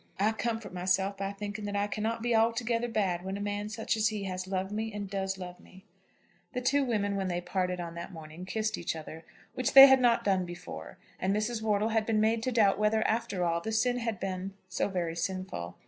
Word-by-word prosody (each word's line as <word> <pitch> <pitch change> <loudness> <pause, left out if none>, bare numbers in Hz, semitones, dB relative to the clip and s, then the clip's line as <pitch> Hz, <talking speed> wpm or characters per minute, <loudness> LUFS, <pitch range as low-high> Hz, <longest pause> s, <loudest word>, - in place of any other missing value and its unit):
I 210 +2 +3
comfort 225 -2 -3
myself 185 +2 +1
by 195 0 -2
thinking 205 +1 -5
that 205 0 -3
I 200 0 +2
cannot 220 +2 -2
be 240 -1 +2
altogether 230 +1 +2
bad 190 -6 0
when 190 +1 -3
a - - -6
man 205 0 -3
such 220 +1 -1
as 215 -1 +2
he 210 -2 -2
has 185 -1 -4
loved 190 0 -2
me 220 +1 -2
and 205 -1 -5
does 190 0 -2
love 180 -1 -8
me." 190 0 -17 0.7
The 250 - -2
two 275 +3 +3
women, 205 -5 0
when 195 -1 -1
they 175 -1 -1
parted 180 0 -2
on 170 -1 -5
that 170 0 -7
morning, 160 +1 -9
kissed 215 +3 -2
each 170 - -2
other, 160 +1 -8 0.3
which 255 - -1
they 270 0 +13
had 265 -1 +6
not 240 -2 +4
done 190 -2 +2
before; 175 0 -8 0.2
and 190 +2 +1
Mrs. 220 +2 -1
Wortle 215 0 +1
had 220 -1 +1
been 220 -2 +2
made 220 +1 +2
to 255 - -1
doubt 210 -4 +3
whether, 215 +1 +2
after 220 -5 -1
all, 170 0 0
the 220 - -4
sin 245 +3 +2
had 230 -4 -2
been 190 0 -4
so 180 - -1
very 175 -4 -2
sinful. 170 - -4
205 Hz, 225 wpm, -30 LUFS, 185-225 Hz, 0.7 s, they